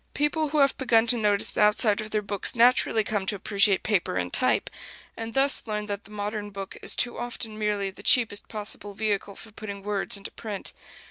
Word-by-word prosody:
People 295 +1 0
who 305 - -2
have 275 -2 +4
begun 235 -4 +3
to 235 - +3
notice 210 -3 +1
the - - -2
outside 210 0 +4
of 215 - -7
their 215 -1 -1
books 200 +2 0
naturally 235 -2 +4
come 205 -2 -3
to 205 - +1
appreciate 200 0 +2
paper 205 - 0
and 90 -1 -2
type; - - +2 0.5
and 225 +1 -7
thus 275 +1 +4
learn 210 -1 -3
that 205 -1 -5
the - - -13
modern 210 0 -4
book 195 -1 -8
is - - +1
too 240 - -1
often 240 -2 -6
merely 205 -2 -1
the 195 - -13
cheapest 215 -2 +3
possible 205 -1 -5
vehicle 205 -2 -2
for 220 - -9
putting 200 -2 -8
words 205 0 +1
into 200 - -9
print. 210 -3 -6
210 Hz, 205 wpm, -26 LUFS, 200-225 Hz, 0.5 s, have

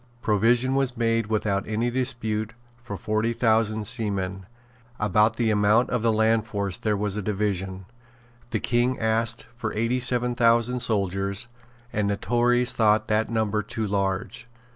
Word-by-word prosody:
Provision 115 +5 +2
was 135 -2 0
made 115 -1 +1
without 105 -2 -1
any 110 +3 -1
dispute 115 -4 -2 0.3
for 105 -4 -7
forty 110 +3 -1
thousand 110 -2 +1
seamen. 100 -4 -1 0.5
About 105 +2 +2
the 115 -1 +1
amount 105 +3 +3
of 125 - 0
the 115 0 +2
land 110 0 +2
force 100 -3 -3
there 105 -2 0
was 105 0 -2
a - - -1
division. 95 -2 -2 0.6
The 110 -1 -1
King 120 +3 0
asked 115 0 0
for 115 -3 -4
eighty 115 +4 0
seven 125 0 +1
thousand 120 +1 +3
soldiers; 100 0 -1 0.5
and 105 -1 0
the 100 - -1
Tories 120 +4 +2
thought 110 -2 +2
that 110 +1 +1
number 110 -2 0
too 110 +2 -4
large. 100 +4 -2
110 Hz, 150 wpm, -25 LUFS, 105-120 Hz, 0.6 s, amount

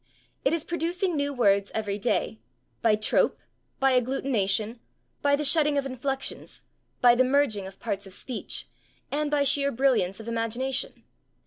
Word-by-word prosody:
It - - +3
is 330 -2 0
producing 345 +2 -1
new 285 -1 0
words 200 -6 +2
every 210 -2 -2
day, 195 - -1 0.4
by 220 -2 +4
trope, 215 0 +2 0.4
by 270 -1 +3
agglutination, 230 -4 0 0.4
by 285 0 +3
the 295 +1 -2
shedding 295 0 +4
of 280 - 0
inflections, 270 +1 -4 0.4
by 245 -1 +7
the 250 +2 +4
merging 255 -7 +1
of 190 0 -13
parts 200 0 -3
of 190 - -10
speech, 250 +3 -3 0.4
and 295 +1 0
by 290 -1 +2
sheer 280 0 +2
brilliance 235 -8 +1
of 220 - -9
imagination. 235 +3 -2
255 Hz, 150 wpm, -26 LUFS, 215-285 Hz, 0.4 s, by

